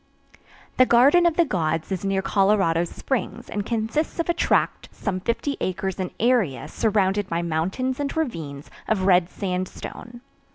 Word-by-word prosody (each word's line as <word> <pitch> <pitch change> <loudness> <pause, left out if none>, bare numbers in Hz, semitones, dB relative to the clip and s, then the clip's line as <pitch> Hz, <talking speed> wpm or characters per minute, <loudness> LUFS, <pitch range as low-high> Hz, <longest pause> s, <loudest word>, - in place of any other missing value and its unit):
The 255 - +6
Garden 280 +9 +6
of 330 - 0
the 340 - +5
Gods 165 - -1
is 190 -1 -2
near 195 -1 0
Colorado 195 -5 +2
Springs 235 +3 -4
and 205 - -2
consists 230 +7 -1
of 335 - -1
a - - +4
tract - - 0
some 190 -3 -3
50 235 +8 -2
acres 190 +1 -2
in 185 -1 -2
area 225 - +1
surrounded 205 -2 +1
by 170 0 -1
mountains 190 - -1
and 285 +2 -3
ravines 160 - -4 0.2
of 200 -4 +1
red 180 -2 +4
sandstone. 190 +6 -5
200 Hz, 155 wpm, -24 LUFS, 180-245 Hz, 0.2 s, The